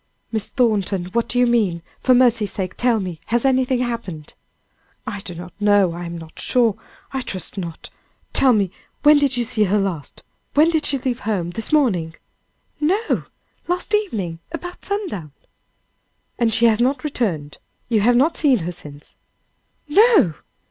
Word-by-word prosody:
"Miss 220 -3 -1
Thornton, 200 -7 0
what 235 -1 +1
do 245 - -1
you 245 - +5
mean? 210 -9 +1 0.2
For 255 - +4
mercy's 235 -4 +3
sake, 185 -2 -4
tell 240 -2 +2
me, 180 -5 -5
has 240 +2 +1
anything 260 -1 +2
happened?" 195 -11 -5 0.7
"I 205 -2 -4
do 180 -2 -8
not 175 +1 -9
know 205 -4 +3
I 175 +1 -6
am 170 0 -6
not 160 -1 -11
sure 235 -5 +2 0.4
I 265 - -2
trust 190 -6 -3
not 170 -4 -7 0.4
tell 265 - +5
me! 200 -6 +2 0.3
when 295 0 +7
did 275 -3 +1
you 240 - +1
see 225 -3 +1
her 200 +2 +2
last? 190 -7 -3 0.3
When 310 +3 +5
did 315 -2 +1
she 280 - 0
leave 255 -1 -2
home? 190 -7 -2
this 225 +4 -5
morning?" 190 - +2 0.6
"No! 385 +9 0 0.4
last 355 +4 -1
evening, 210 - -1
about 355 +2 -7
sundown." 350 - -4 1.1
"And 235 -2 +2
she 230 +2 +3
has 225 0 +4
not 255 +1 +1
returned? 185 - -2 0.3
You 220 -3 +2
have 240 +4 +4
not 290 +7 +3
seen 280 -5 +4
her 175 - -2
since?" 150 -4 -11 0.7
"No!" 390 - +5
225 Hz, 165 wpm, -21 LUFS, 185-265 Hz, 1.1 s, when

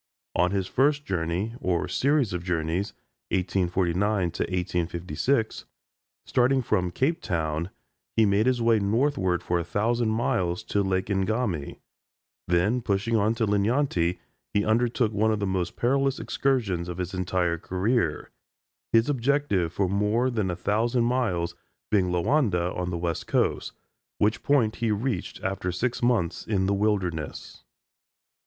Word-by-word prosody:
On 90 - +3
his 95 -1 -1
first 145 +7 +1
journey, 90 +4 -2
or 90 -2 0
series 140 -6 +1
of 90 -1 -3
journeys 85 +2 -1 0.4
(1849 90 +1 0
1856,) 90 - -1 0.6
starting 130 +1 +2
from 90 -5 +1
Cape 145 - 0
Town, 80 - -2 0.5
he 110 - +6
made 100 +3 +2
his 125 -2 +2
way 115 -1 +4
northward 100 -4 +1
for 85 0 0
a - - -2
thousand 115 +6 0
miles 95 -6 0
to 100 - 0
Lake 95 -1 0
Ngami; 100 - -1 0.7
then 90 +8 +2
pushing 110 +1 0
on 110 +1 +2
to 115 - +1
Linyanti, 100 -4 +1 0.3
he 105 - +1
undertook 115 0 +2
one 110 +2 +2
of 110 - 0
the 100 - -1
most 95 -2 -2
perilous 135 +2 +1
excursions 105 -11 0
of 90 - -5
his 90 0 -4
entire 90 -2 0
career, 95 -1 -1 0.6
his 115 +1 +4
objective 135 - +1
for 95 +2 0
more 105 +6 +1
than 110 -5 -1
a 90 - -1
thousand 115 +6 +1
miles 115 -9 0 0.4
being 95 -4 +3
Loanda 90 - +1
on 90 0 -2
the 85 - -2
West 85 -1 -3
Coast, - - 0 0.4
which 105 +2 +1
point 120 -7 +2
he 115 - 0
reached 105 -2 -2
after 95 -1 -2
six 120 +7 -2
months 115 -8 0
in 95 -3 +1
the 100 - +1
wilderness. 95 -8 -2
100 Hz, 140 wpm, -26 LUFS, 90-115 Hz, 0.7 s, he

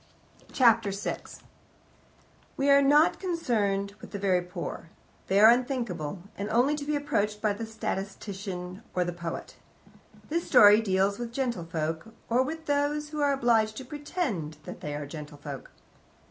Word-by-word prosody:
Chapter 230 -5 +4
6 195 +1 -5 1.1
We 280 +1 +3
are 280 0 +7
not 290 +3 +4
concerned 210 - 0
with - - -10
the 205 - -5
very 190 -2 +2
poor. 175 -2 -6 0.4
They 195 +1 +3
are 220 +2 +9
unthinkable, 235 - -1
and 200 +1 -4
only 245 +6 +3
to 285 - -5
be 300 +1 0
approached 210 -8 -1
by 210 -1 +1
the 225 +2 -6
statistician 195 -3 -5
or 180 -1 +2
the 175 - -3
poet. 170 -1 -6 0.7
This 335 +2 -2
story 210 +1 +8
deals 195 0 +1
with 240 -1 -4
gentlefolk, 175 - -3
or 240 +2 +3
with 320 +4 -4
those 290 +1 0
who 300 0 -4
are 285 -1 +3
obliged 230 -5 +2
to 265 - -6
pretend 260 - -3
that - - -9
they 145 -1 -4
are 145 0 -4
gentlefolk. 145 -2 -8
215 Hz, 150 wpm, -28 LUFS, 185-275 Hz, 1.1 s, are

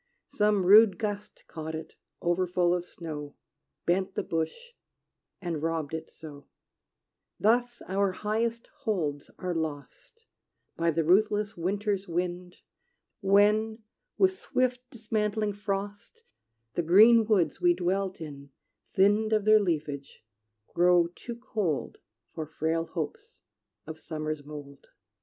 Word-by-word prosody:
Some 210 -2 +2
rude 205 0 +7
gust 205 -2 -5
Caught 160 0 -6
it, 160 0 -8 0.3
over 175 +1 +1
full 175 0 +2
of 180 0 -2
snow, 150 -3 -7 0.5
Bent 190 +2 0
the - - -1
bush, 170 - -3 0.7
and 170 -5 -3
robbed 160 -2 -2
it 160 - -5
so 145 -3 -12 0.9
Thus 240 +3 +2
our 195 +1 +1
highest 225 +4 -1
holds 165 - -2
are 180 -1 -3
lost, 160 - -6 0.5
By 170 0 +1
the 165 0 +1
ruthless 205 +4 +2
winter's 200 +3 -1
wind, 180 +1 -3 0.6
When, 215 +2 +3 0.3
with 380 -1 +5
swift 255 -8 -1
dismantling 215 -2 -1
frost, 205 0 -5 0.5
The - - 0
green 215 +7 +7
woods 180 -9 +2
we 175 -1 +4
dwelt 185 +1 -1
in, 140 -3 -9 0.4
thinn'd 205 +3 +3
Of 215 -2 +2
their 215 0 +7
leafage, 150 - -3 0.5
grow 175 -1 +4
too 235 +5 -8
cold 210 - -3 0.3
For 155 -1 -5
frail 160 +1 -1
hopes 450 +1 -6 0.4
of 160 0 -8
summer's 155 -2 -4
mold. 145 -1 -10
185 Hz, 120 wpm, -28 LUFS, 160-215 Hz, 0.9 s, rude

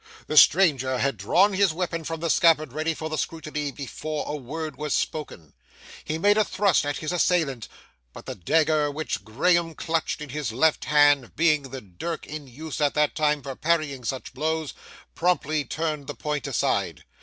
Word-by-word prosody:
The 155 - -4
stranger 140 -7 +5
had 135 +1 0
drawn 180 - +3
his 190 -3 +3
weapon 170 -1 -3
from 165 0 -5
the 165 -2 +1
scabbard 155 -5 +3
ready 155 +2 -1
for 155 - -5
the 155 -1 -3
scrutiny, 150 -2 -3
before 145 +3 -5
a 150 - -3
word 150 +2 -6
was 150 0 -2
spoken. 90 - -4 0.5
He 155 - -3
made 205 +5 +3
a - - +5
thrust 195 -7 +1
at 145 - -2
his 155 - -4
assailant, 160 - +1 0.4
but - - -12
the - - -5
dagger 150 - +2
which 155 +2 -4
Graham 165 +8 +1
clutched 165 +1 -2
in 150 -1 -7
his 140 -3 -3
left 150 +7 +2
hand 145 -4 +4
being 150 -4 +2
the 130 -1 -7
dirk 105 - -6
in 150 -2 -8
use 150 +5 -7
at 145 -1 +2
that 150 -1 +2
time 150 -2 +1
for 135 -1 -6
parrying 155 -5 0
such 130 +3 -4
blows, 155 +2 -2 0.4
promptly 155 -4 0
turned 155 0 -3
the - - -5
point 150 -2 -3
aside. - - -1
155 Hz, 180 wpm, -25 LUFS, 140-165 Hz, 0.5 s, stranger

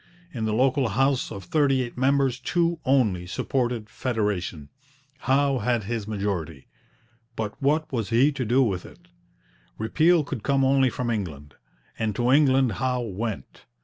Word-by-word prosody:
In 115 -4 -3
the 110 - 0
local 130 +2 +2
house, 135 +5 +1
of 100 -3 -7
thirty 135 - +2
eight 120 - -8
members 130 -1 +1
two 170 -1 0
only 110 -10 +2
supported 120 +2 -2
federation. 105 - -3 0.5
Howe 135 +1 +2
had 120 0 0
his 110 0 -4
majority; 95 -9 -3 0.7
but 110 -2 -3
what 150 +3 +1
was 115 -5 -2
he 125 +6 +4
to 135 -3 -3
do 125 +4 +3
with 95 -7 -1
it? - - -16 0.7
Repeal 160 +9 +3
could 140 -5 -5
come 135 +3 +2
only 135 -1 +3
from 120 -1 -3
England, 75 -10 -5 0.5
and 110 -2 -1
to 120 +3 +1
England 135 -3 +4
Howe 125 -1 0
went. 110 -1 -6
120 Hz, 150 wpm, -25 LUFS, 105-135 Hz, 0.7 s, he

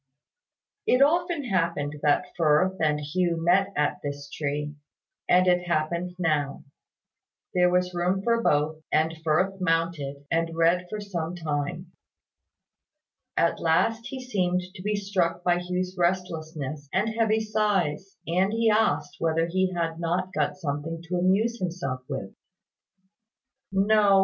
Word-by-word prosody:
It 250 +2 +5
often 340 +1 +2
happened 165 - -1
that 150 +5 +3
Firth 175 +3 +3
and 150 -1 +2
Hugh 170 +3 0
met 180 +4 +3
at 150 0 0
this 145 0 -6
tree; 150 0 -3 0.6
and 180 +1 +5
it 180 -1 +2
happened 170 +2 -1
now. 150 -5 0 0.9
There 180 -1 +4
was 180 0 +1
room 180 +2 0
for 230 +1 +2
both; 155 -4 +1
and 160 +1 +2
Firth 185 +5 +1
mounted, 165 -5 -1
and 165 0 0
read 175 +2 +3
for 215 - -4
some 180 -4 -4
time. 150 -4 -3 1.5
At 170 - +2
last 225 +8 +1
he 265 - -6
seemed 185 -8 0
to 185 - -10
be 210 +2 0
struck 185 -4 -1
by 175 -1 +3
Hugh's 180 +1 -3
restlessness 160 -5 -2
and 205 +4 +1
heavy 220 -1 +1
sighs; 200 -5 0
and 185 +4 +1
he 225 -1 +3
asked 220 +1 +1
whether 165 0 +1
he 185 +2 0
had 165 -2 -2
not 180 +2 -1
got - - 0
something 165 0 -4
to 180 - 0
amuse 205 +6 +2
himself 165 -8 -3
with. 100 -9 -5 1.4
"No. 200 0 +4
175 Hz, 135 wpm, -26 LUFS, 160-195 Hz, 1.5 s, It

